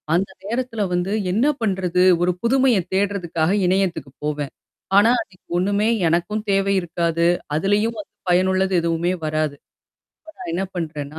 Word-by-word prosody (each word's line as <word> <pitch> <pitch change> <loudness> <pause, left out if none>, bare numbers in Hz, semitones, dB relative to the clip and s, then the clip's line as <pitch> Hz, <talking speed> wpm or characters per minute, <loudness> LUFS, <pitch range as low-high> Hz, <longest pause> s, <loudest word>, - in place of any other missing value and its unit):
அந்த 190 +2 0 0.2
நேரத்தில 235 0 -3
வந்து 180 +2 -1 0.2
என்ன 230 +9 +2
பண்றது? 185 -4 0 0.2
ஒரு 180 +1 +3
புதுமைய 260 -1 +3 0.2
தேட்றதுக்காக 185 -4 0 0.2
இணையத்துக்கு 180 -7 0
போவேன். 150 -2 -2 0.5
ஆனா, 225 +3 +6
அதுக்கு 185 -3 -26
ஒண்ணுமே 200 +4 +1 0.2
எனக்கும் 190 +6 0
தேவை 195 0 +2
இருக்காது. 170 0 -1 0.3
அதுலயும் 205 +7 +1
வந்து 205 - -9 0.2
பயனுள்ளது 190 +1 +2
எதுவுமே 170 +1 0
வராது. 155 -1 -1 0.8
நான் 245 -9 -7
என்ன 180 +3 -1
பண்றேன்னா, 155 -3 -5
185 Hz, 130 wpm, -21 LUFS, 170-205 Hz, 0.8 s, ஆனா